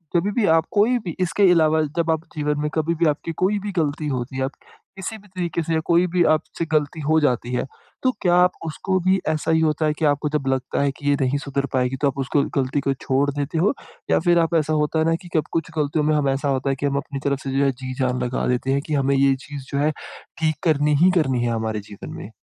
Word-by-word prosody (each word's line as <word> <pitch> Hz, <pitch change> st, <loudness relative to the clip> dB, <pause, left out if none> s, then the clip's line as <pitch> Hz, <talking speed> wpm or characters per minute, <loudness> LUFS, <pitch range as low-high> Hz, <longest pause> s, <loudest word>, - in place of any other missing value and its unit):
जभी 190 Hz, +5 st, +2 dB
भी 225 Hz, 0 st, +1 dB
आप 160 Hz, -, +1 dB
कोई 220 Hz, +4 st, +3 dB
भी 175 Hz, -7 st, -6 dB
इसके 185 Hz, +1 st, +3 dB
अलावा 160 Hz, -2 st, +4 dB, 0.2 s
जब 165 Hz, -1 st, +2 dB
आप 160 Hz, 0 st, -1 dB
जीवन 150 Hz, -1 st, -1 dB
में 150 Hz, -, -1 dB
कभी 160 Hz, +1 st, 0 dB
भी 170 Hz, +1 st, +1 dB
आपकी 150 Hz, +2 st, -1 dB
कोई 200 Hz, +3 st, +1 dB
भी 205 Hz, 0 st, -5 dB
ग़लती 155 Hz, -3 st, -1 dB
होती 130 Hz, -1 st, -3 dB
है, 130 Hz, -, 0 dB
आप 135 Hz, -, -2 dB, 0.5 s
किसी 195 Hz, +3 st, -5 dB
भी 205 Hz, 0 st, -18 dB
तरीके 175 Hz, -3 st, -3 dB
से 165 Hz, -, -2 dB
या 160 Hz, -, +2 dB
कोई 170 Hz, +1 st, +4 dB
भी 180 Hz, -1 st, +4 dB
आपसे 165 Hz, +2 st, -5 dB
ग़लती 155 Hz, +1 st, 0 dB
हो 155 Hz, +2 st, +3 dB
जाती 125 Hz, -3 st, 0 dB
है, 125 Hz, -, 0 dB, 0.4 s
तो 255 Hz, -, +4 dB
क्या 175 Hz, -3 st, +3 dB
आप 180 Hz, 0 st, +5 dB
उसको 185 Hz, +4 st, -1 dB
भी 185 Hz, +2 st, +2 dB
ऐसा 155 Hz, +1 st, 0 dB
ही 160 Hz, -, +3 dB
होता 155 Hz, 0 st, +1 dB
है 150 Hz, -, +2 dB
कि 160 Hz, -, +1 dB
आपको 145 Hz, +1 st, +1 dB
जब 145 Hz, -2 st, -2 dB
लगता 130 Hz, +1 st, -1 dB
है 140 Hz, -, +2 dB
कि 145 Hz, +1 st, -4 dB
ये 145 Hz, -, +4 dB
नहीं 135 Hz, +2 st, +1 dB
सुधर 140 Hz, -1 st, -2 dB
पाएगी 125 Hz, 0 st, +1 dB
तो 145 Hz, -, +3 dB
आप 140 Hz, -, -2 dB
उसको 135 Hz, +1 st, +1 dB, 0.2 s
ग़लती 135 Hz, +1 st, +1 dB
को 135 Hz, 0 st, 0 dB
छोड़ 135 Hz, +2 st, 0 dB
देते 145 Hz, +3 st, -3 dB
हो? 185 Hz, -, +3 dB, 0.4 s
या -, -, +4 dB
फिर 175 Hz, 0 st, +3 dB
आप 165 Hz, +1 st, +1 dB
ऐसा 155 Hz, -1 st, +1 dB
होता 150 Hz, +1 st, +1 dB
है 160 Hz, -, +2 dB
ना 165 Hz, 0 st, +2 dB
कि 175 Hz, -, -12 dB
कभी 155 Hz, -, 0 dB
कुछ 165 Hz, -1 st, -2 dB
गलतियों 150 Hz, +1 st, +1 dB
में 155 Hz, 0 st, +2 dB
हम 145 Hz, -2 st, +1 dB
ऐसा 135 Hz, +1 st, -1 dB
होता 135 Hz, 0 st, 0 dB
है, 135 Hz, -, +1 dB
कि 140 Hz, -, -4 dB
हम 140 Hz, 0 st, 0 dB
अपनी 140 Hz, 0 st, -4 dB
तरफ 140 Hz, -1 st, +1 dB
से 135 Hz, -, -3 dB
जो 140 Hz, -, +3 dB
है 135 Hz, -, +3 dB
जी 130 Hz, 0 st, -7 dB
जान 125 Hz, -1 st, 0 dB
लगा 125 Hz, 0 st, -2 dB
देते 125 Hz, +2 st, 0 dB
हैं 140 Hz, +1 st, +1 dB
कि 155 Hz, -, -2 dB
हमें 140 Hz, -1 st, +2 dB
ये 135 Hz, 0 st, +4 dB
चीज़ 140 Hz, -2 st, -8 dB
जो 140 Hz, -, -1 dB
है 150 Hz, +2 st, +2 dB, 0.5 s
ठीक 155 Hz, -1 st, +1 dB
करनी 150 Hz, -1 st, +3 dB
ही 185 Hz, -, +6 dB
करनी 130 Hz, -5 st, 0 dB
है, 120 Hz, -, 0 dB
हमारे 110 Hz, -1 st, -2 dB
जीवन 100 Hz, -, -9 dB
में? -, -, -8 dB
150 Hz, 270 wpm, -22 LUFS, 135-165 Hz, 0.5 s, ही